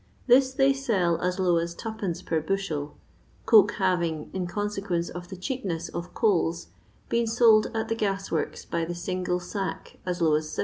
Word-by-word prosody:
This 260 Hz, +1 st, +5 dB
they 270 Hz, +1 st, +3 dB
sell 200 Hz, -11 st, 0 dB
as 180 Hz, +1 st, 0 dB
low 180 Hz, -3 st, +3 dB
as 170 Hz, 0 st, -2 dB
2</. 195 Hz, -6 st, -4 dB
per 160 Hz, -1 st, 0 dB
bushel, 155 Hz, -4 st, -2 dB, 0.5 s
coke 210 Hz, -3 st, +6 dB
having, 170 Hz, -5 st, 0 dB
in 185 Hz, -2 st, -2 dB
consequence 195 Hz, -3 st, -2 dB
of 175 Hz, 0 st, -8 dB
the 190 Hz, -, -8 dB
cheapness 185 Hz, -, -3 dB
of 175 Hz, +1 st, -7 dB
coals, 170 Hz, -6 st, +1 dB, 0.4 s
been 235 Hz, 0 st, +1 dB
sold 225 Hz, -2 st, +5 dB
at 220 Hz, -, -1 dB
the -, -, 0 dB
gas 195 Hz, -3 st, -2 dB
worki 160 Hz, -, -3 dB
by 170 Hz, -1 st, 0 dB
the 175 Hz, +1 st, -4 dB
single 180 Hz, 0 st, -2 dB
sack 190 Hz, +2 st, -5 dB
as 180 Hz, -1 st, -3 dB
low 160 Hz, -3 st, +3 dB
as 155 Hz, +1 st, +1 dB
7(£. -, -, -8 dB
185 Hz, 180 wpm, -26 LUFS, 170-215 Hz, 0.5 s, coke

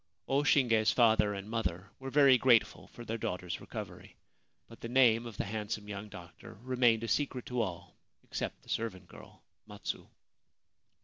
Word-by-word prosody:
O 135 Hz, +1 st, +2 dB
Shinge's 115 Hz, -7 st, +3 dB
father 110 Hz, -3 st, +4 dB
and 100 Hz, +1 st, -7 dB
mother 95 Hz, -4 st, -3 dB
were 135 Hz, 0 st, -6 dB
very 140 Hz, -1 st, +6 dB
grateful 125 Hz, -3 st, +3 dB
for 120 Hz, -, -11 dB
their 115 Hz, +1 st, -4 dB
daughter's 90 Hz, -3 st, -4 dB
recovery; -, -, -8 dB, 0.5 s
but 115 Hz, -, -15 dB
the 115 Hz, -, -5 dB
name 120 Hz, -2 st, +4 dB
of 110 Hz, -4 st, -10 dB
the -, -, -1 dB
handsome 105 Hz, 0 st, -4 dB
young 105 Hz, +1 st, -6 dB
doctor 90 Hz, -4 st, -12 dB
remained 120 Hz, -3 st, +2 dB
a -, -, -2 dB
secret 130 Hz, -1 st, -1 dB
to 125 Hz, -1 st, -1 dB
all 90 Hz, -4 st, -5 dB, 0.3 s
except -, -, -5 dB
the -, -, -19 dB
servant 95 Hz, -5 st, -3 dB
girl -, -, -15 dB, 0.2 s
Matsu. -, -, -6 dB
115 Hz, 165 wpm, -32 LUFS, 100-125 Hz, 0.5 s, very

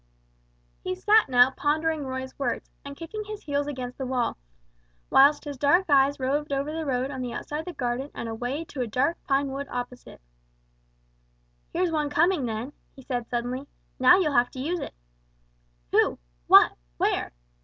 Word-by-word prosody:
He 370 Hz, 0 st, -2 dB
sat 420 Hz, 0 st, +4 dB
now 250 Hz, 0 st, +6 dB
pondering 300 Hz, +1 st, 0 dB
Roy's 260 Hz, 0 st, -5 dB
words, 250 Hz, -4 st, -2 dB
and 280 Hz, 0 st, -9 dB
kicking 385 Hz, +6 st, -6 dB
his 425 Hz, 0 st, -8 dB
heels 285 Hz, -1 st, -1 dB
against 255 Hz, -3 st, -6 dB
the 265 Hz, -, -2 dB
wall, 250 Hz, -2 st, 0 dB, 0.8 s
whilst 285 Hz, +2 st, +6 dB
his 285 Hz, -3 st, -6 dB
eyes 285 Hz, -3 st, +4 dB
roved 285 Hz, +3 st, -1 dB
over 280 Hz, +2 st, -1 dB
the 320 Hz, -1 st, -4 dB
road 260 Hz, +1 st, -1 dB
on 260 Hz, -2 st, -5 dB
the 245 Hz, -2 st, -4 dB
outside 295 Hz, +5 st, -4 dB
of 320 Hz, -, -6 dB
the 360 Hz, -, -6 dB
garden 255 Hz, 0 st, -2 dB
and 235 Hz, -, -5 dB
away 245 Hz, +8 st, -3 dB
to 285 Hz, -4 st, -6 dB
a 245 Hz, -, -1 dB
dark 270 Hz, +9 st, 0 dB
pine 275 Hz, 0 st, +1 dB
wood 275 Hz, +1 st, -4 dB
opposite. 245 Hz, 0 st, -7 dB, 1.5 s
"Here's 355 Hz, 0 st, 0 dB
one 300 Hz, -2 st, 0 dB
coming 320 Hz, -2 st, +2 dB
then," 225 Hz, +5 st, -4 dB, 0.2 s
he 265 Hz, -, -13 dB
said, 245 Hz, -2 st, -3 dB
suddenly; 250 Hz, +3 st, -3 dB, 0.3 s
"now 255 Hz, +8 st, +7 dB
you'll 320 Hz, -6 st, +1 dB
have 245 Hz, -1 st, +3 dB
to 260 Hz, -, -7 dB
use 335 Hz, +7 st, -1 dB
it." -, -, -7 dB, 1.0 s
"Who? -, -, +3 dB, 0.3 s
What? -, -, +8 dB, 0.3 s
Where?" -, -, 0 dB
280 Hz, 170 wpm, -26 LUFS, 255-305 Hz, 1.5 s, What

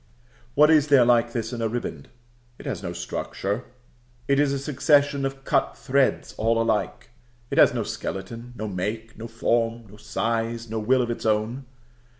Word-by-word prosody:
What 150 Hz, +2 st, +6 dB
is 155 Hz, -2 st, +5 dB
there 140 Hz, -4 st, +6 dB
like 120 Hz, -1 st, +3 dB
this 115 Hz, 0 st, -3 dB
in 120 Hz, -, -4 dB
a 115 Hz, -, +1 dB
riband? 110 Hz, -, -5 dB, 0.5 s
It -, -, -12 dB
has -, -, -3 dB
no -, -, -4 dB
structure: 100 Hz, +5 st, -4 dB, 0.6 s
it 140 Hz, 0 st, +3 dB
is 145 Hz, -1 st, +3 dB
a 140 Hz, -, 0 dB
succession 140 Hz, 0 st, +2 dB
of 135 Hz, 0 st, -9 dB
cut -, -, 0 dB
threads 135 Hz, 0 st, +1 dB
all 115 Hz, +1 st, +2 dB
alike; 115 Hz, 0 st, -1 dB, 0.4 s
it -, -, +1 dB
has -, -, +7 dB
no -, -, -2 dB
skeleton, 115 Hz, +5 st, -6 dB
no 110 Hz, -2 st, -4 dB
make, 105 Hz, +4 st, -4 dB
no 115 Hz, -, -7 dB
form, 115 Hz, 0 st, 0 dB
no 105 Hz, +1 st, -15 dB
size, 115 Hz, +2 st, -2 dB
no 110 Hz, -, -1 dB
will 125 Hz, +4 st, +3 dB
of 120 Hz, -, -2 dB
its 115 Hz, -, -3 dB
own. 110 Hz, +5 st, 0 dB
115 Hz, 175 wpm, -25 LUFS, 110-135 Hz, 0.6 s, has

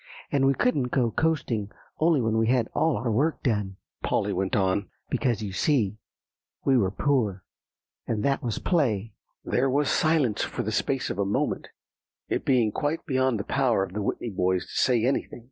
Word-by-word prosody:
"And 135 Hz, -1 st, +3 dB
we 135 Hz, -, +3 dB
couldn't 145 Hz, -, +1 dB
go 125 Hz, -2 st, +1 dB
coasting 120 Hz, -8 st, 0 dB, 0.3 s
only 160 Hz, -3 st, +3 dB
when 110 Hz, -1 st, 0 dB
we 115 Hz, -, +2 dB
had 120 Hz, -2 st, +2 dB
all 160 Hz, -3 st, +2 dB
our 120 Hz, -1 st, -1 dB
work 145 Hz, +9 st, 0 dB
done," 105 Hz, -6 st, -1 dB, 0.2 s
Polly -, -, 0 dB
went 95 Hz, +1 st, -1 dB
on, 95 Hz, -1 st, +1 dB, 0.2 s
"because, 115 Hz, -4 st, 0 dB
you 100 Hz, -, -4 dB
see, 110 Hz, -1 st, +1 dB, 0.7 s
we 135 Hz, -, +4 dB
were 100 Hz, -7 st, +3 dB
poor, 105 Hz, -, 0 dB, 0.6 s
and 110 Hz, -2 st, -1 dB
that 140 Hz, -1 st, +1 dB
was 115 Hz, -3 st, -2 dB
play." 115 Hz, -, 0 dB, 0.3 s
There 135 Hz, +2 st, +1 dB
was 140 Hz, +1 st, +1 dB
silence 155 Hz, -, +2 dB
for -, -, -2 dB
the 110 Hz, -, -2 dB
space 130 Hz, +4 st, -1 dB
of 100 Hz, -, -5 dB
a -, -, +3 dB
moment, 100 Hz, +1 st, -1 dB, 0.6 s
it -, -, -1 dB
being 120 Hz, -5 st, +3 dB
quite 150 Hz, +8 st, -2 dB
beyond 130 Hz, -4 st, +1 dB
the -, -, -2 dB
power 120 Hz, -7 st, +1 dB
of 95 Hz, -1 st, -6 dB
the 105 Hz, -, -2 dB
Whitney 110 Hz, +3 st, -2 dB
boys 90 Hz, -1 st, +1 dB
to -, -, -13 dB
say 120 Hz, -3 st, +2 dB
anything. 130 Hz, -1 st, -1 dB
120 Hz, 185 wpm, -26 LUFS, 105-135 Hz, 0.7 s, we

